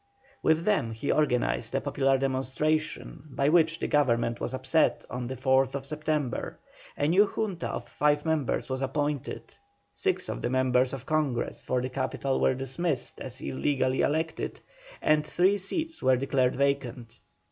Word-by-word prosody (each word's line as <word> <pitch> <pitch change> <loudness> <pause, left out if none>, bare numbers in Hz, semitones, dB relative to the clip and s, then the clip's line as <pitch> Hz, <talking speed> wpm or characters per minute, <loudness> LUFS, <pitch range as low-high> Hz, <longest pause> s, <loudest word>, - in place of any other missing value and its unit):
With 160 +2 +2
them 190 - +1
he 115 +5 -2
organized 125 - +1
a - - +3
popular 135 -1 +2
demonstration 135 +4 -1
by 140 +1 +1
which 165 0 +4
the - - -1
Government 120 -5 +1
was - - -2
upset 135 +4 +1
on 125 -1 -3
the 130 - -4
4th 135 +1 +1
September, 150 -2 -2 0.4
a 145 - +1
new 195 +6 +5
Junta 200 -6 -3
of - - -5
five 145 0 +1
members 160 -5 0
was 130 0 -3
appointed, 145 +1 -2 0.4
six - - -1
of - - -4
the - - -1
members 130 0 +2
of 135 -1 -6
Congress 150 -6 -1
for 125 -1 -1
the 130 - -2
capital 130 +1 -1
were 130 - +3
dismissed 135 +3 -2
as - - -6
illegally 130 - 0
elected, 160 +2 -1 0.4
and 150 0 +4
three 185 +6 +2
seats 320 - -3
were 130 -1 +4
declared 130 -1 +1
vacant. 125 -4 -1
135 Hz, 155 wpm, -28 LUFS, 130-155 Hz, 0.4 s, new